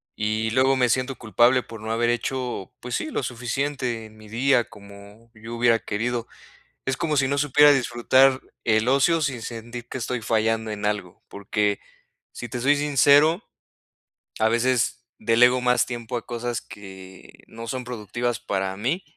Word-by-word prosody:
Y 110 +1 -1
luego 130 +2 +3
me 125 -2 +2
siento 130 +2 0
culpable 120 +3 +3
por 115 -2 -11
no 110 +1 -4
haber 120 +1 +1
hecho, 125 -2 -3
pues 125 0 -7
sí, - - -1
lo 140 - -3
suficiente 125 0 -3
en 110 - -15
mi 110 -1 -15
día, 125 +1 +2
como 100 +3 -15
yo 115 +1 -8
hubiera 115 -1 +3
querido. 120 +2 -3 0.6
Es 130 0 -1
como 155 -3 -1
si 135 -1 +3
no 140 +1 0
supiera 145 +1 +6
disfrutar 130 +1 +3 0.2
el 110 0 +2
ocio 160 +5 +3
sin 135 -6 -2
sentir 120 +1 -7
que - - -5
estoy 125 0 -3
fallando 110 0 0
en 105 -1 -4
algo, 105 -4 -3
porque 100 0 -1 0.5
si 120 - -7
te 120 +2 -4
soy 145 +3 +4
sincero, 145 - +4 1.0
a 110 - +4
veces 125 +1 0
delego 125 +3 +4
más 125 -1 +3
tiempo 120 0 -5
a - - -7
cosas 120 -2 -3
que 95 -2 -13
no 115 +1 -9
son 125 +1 -4
productivas 120 0 -3
para 95 -1 -2
mí. 140 - -1
120 Hz, 165 wpm, -24 LUFS, 110-130 Hz, 1.0 s, supiera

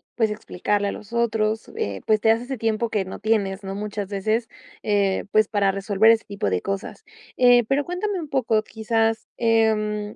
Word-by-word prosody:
pues 220 -3 +1
explicarle 205 -1 -2
a - - -2
los 215 +2 -10
otros, 220 -2 0
eh, 100 -1 -3
pues 215 -1 +3
te 220 - +2
das 225 +1 +3
ese 260 +1 -5
tiempo 225 +1 -1
que 205 -3 -1
no 190 - -8
tienes, 205 -3 0
¿no?, 195 0 -5
muchas 205 -1 -4
veces, 215 +4 -1 0.3
eh, 200 -2 +1
pues 215 0 +4
para 200 -2 +1
resolver 200 +3 +3
ese 225 - +1
tipo 200 - -2
de 90 -1 0
cosas. 195 0 -5 0.3
Eh, 245 -1 +6
pero 280 +1 +1
cuéntame 370 +2 -2
un 310 - -6
poco, 230 -5 +1
quizás, 225 0 -1
em, 215 -2 +1
215 Hz, 190 wpm, -23 LUFS, 200-225 Hz, 0.3 s, Eh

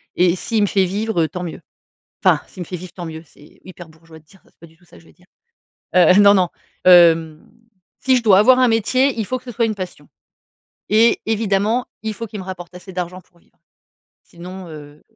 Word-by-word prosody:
et 180 0 +2
s'il 220 +3 -2
me - - +2
fait 190 -1 +1
vivre, 205 -1 -2
heu, - - 0
tant 180 +3 -6
mieux. 170 - -7 0.6
Enfin, - - +3
«s'il 185 - -11
me - - -12
fait 180 - -7
vivre, 180 0 -11
tant 175 - -8
mieux», 160 -1 -8
c'est 150 0 -21
hyper 175 -2 -12
bourgeois 160 0 -17
de 155 - -27
dire 195 +3 -23
ça. - - -27
C'est - - -43
pas - - -14
du 160 - -24
tout 175 - -29
ça, - - -19
je 165 - -22
veux - - -20
dire. 180 - -27 0.7
Heu, 180 0 +6
non, 200 0 +7
non, 180 -2 +1 0.4
hem, 165 -3 +5 0.5
si 260 -1 +2
je 245 - -1
dois 200 -4 +5
avoir 255 +4 +5
un 255 - +4
métier, 255 +5 +1
il 220 - -1
faut 255 +5 -3
que - - -27
ce 245 - -7
soit 235 0 0
une 220 - -2
passion 185 -2 -8 0.8
et 225 +2 +3
évidemment, 220 +2 0 0.2
il 220 0 -3
faut 230 +2 -7
qu'il 210 0 -8
me - - -7
rapporte 180 -2 -9
assez 180 +1 -12
d'argent 180 0 -5
pour 175 - -30
vivre, - - -34 0.7
sinon, 180 +2 -11
heu 150 -1 -12
185 Hz, 235 wpm, -19 LUFS, 170-215 Hz, 0.8 s, non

